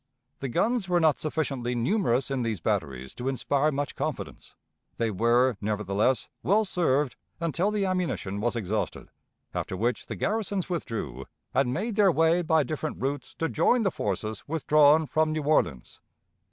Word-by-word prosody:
The 135 - -3
guns 220 - 0
were 175 -1 +3
not 160 -3 +3
sufficiently 135 -6 -2
numerous 130 - +1
in 135 -2 0
these 115 -5 -1
batteries 65 -4 -2
to 125 - -5
inspire 140 +3 +1
much 145 0 -2
confidence; - - -5 0.4
they 115 -1 0
were 120 +3 +3
nevertheless 105 +3 0
well 215 +3 +3
served 150 -8 +1 0.2
until 170 +4 0
the 210 -2 0
ammunition 175 - -2
was 120 +2 0
exhausted, 110 -1 -3 0.4
after 95 - -3
which 120 +5 -1
the 110 - -4
garrisons 200 - -1
withdrew, 75 - -4 0.3
and 135 -2 +2
made 205 - -2
their 200 -3 +6
way 165 +2 +3
by 160 -2 +3
different 155 +3 -4
routes 135 0 -3
to 165 - -1
join 245 +7 +2
the 195 - +2
forces 105 - -3
withdrawn 155 0 +4
from 155 +1 +1
New 155 -1 -2
Orleans. 140 - 0
140 Hz, 155 wpm, -27 LUFS, 115-170 Hz, 0.4 s, their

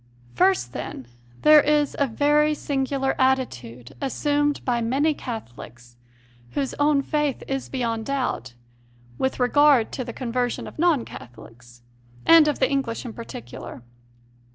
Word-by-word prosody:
First, 125 -4 +2
then, 130 - -6 0.4
there 305 0 +8
is 295 0 +1
a 280 - +2
very 295 +5 +2
singular 270 -1 -1
attitude 125 - -1
assumed 290 +1 0
by 240 -2 0
many 275 +7 +1
Catholics, 120 - -9 0.6
whose 275 -2 -2
own 290 -1 +3
faith 295 -2 -1
is 270 -1 -3
beyond 230 -4 -2
doubt, 255 - -3 0.6
with 265 - -1
regard 270 -1 +4
to 255 - -4
the 235 - -6
conversion 245 0 -2
of - - -11
non 325 -8 +2
Catholics, 120 0 -13 0.4
and 330 -2 +7
of 295 - 0
the 260 - +2
English 270 -3 -2
in 235 - -6
particular. 120 - -9
265 Hz, 130 wpm, -24 LUFS, 220-290 Hz, 0.6 s, there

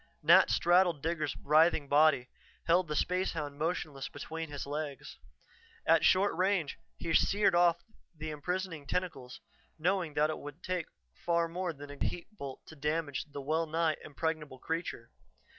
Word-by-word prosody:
Nat - - +7
straddled 175 -3 +3
Digger's 155 -3 -1
writhing 155 0 +4
body, 145 -3 +4 0.4
held 175 +1 +3
the 150 - -3
spacehound 160 -5 -1
motionless 155 -4 -2
between 160 +3 -6
his 145 -1 -5
legs. 145 -1 -5 0.7
At - - +5
short 195 +2 +4
range, 185 -5 0 0.2
he 165 -1 -3
seared 200 +1 +4
off 175 -1 +4 0.3
the 155 0 -5
imprisoning 165 0 -4
tentacles, 140 -8 -3 0.4
knowing 170 -2 0
that 150 +1 +3
it - - -5
would 145 +4 -10
take 180 -3 -2 0.4
far 170 -1 +2
more 175 +1 -3
than 145 -2 -10
a 145 - -5
heat 180 +5 -4
bolt 140 -8 -8
to 160 - -12
damage 150 0 -2
the 145 -2 -8
well 160 +4 0
nigh 160 0 +1
impregnable 150 -2 -3
creature. 160 -6 -4
160 Hz, 150 wpm, -32 LUFS, 145-175 Hz, 0.7 s, Nat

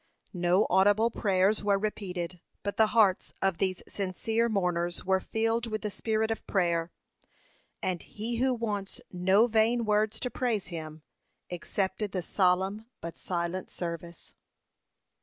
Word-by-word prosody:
No 180 +2 +3
audible 205 +5 +4
prayers 195 0 +2
were 200 -1 +3
repeated, 185 -4 -4 0.2
but 205 - -2
the 220 - +5
hearts 210 -5 +3
of 190 -3 0
these 185 -2 0
sincere 220 +4 -1
mourners 175 -4 0
were 190 0 +3
filled 225 +4 0
with 215 -1 -3
the 210 - -2
spirit 220 +1 0
of 225 - -3
prayer; 170 -3 +1 0.9
and 180 -2 -1
He 230 +3 -4
who 260 +2 +3
wants 205 -4 -3
no 190 +5 +4
vain 230 +1 +2
words 215 +1 +1
to 250 - -2
praise 230 -6 -1
Him, 155 -2 -7 0.5
accepted 190 +3 -2
the 185 -2 -1
solemn 190 +4 +1
but 170 0 -6
silent 175 +1 -3
service. 170 -1 -6
195 Hz, 140 wpm, -29 LUFS, 180-220 Hz, 0.9 s, the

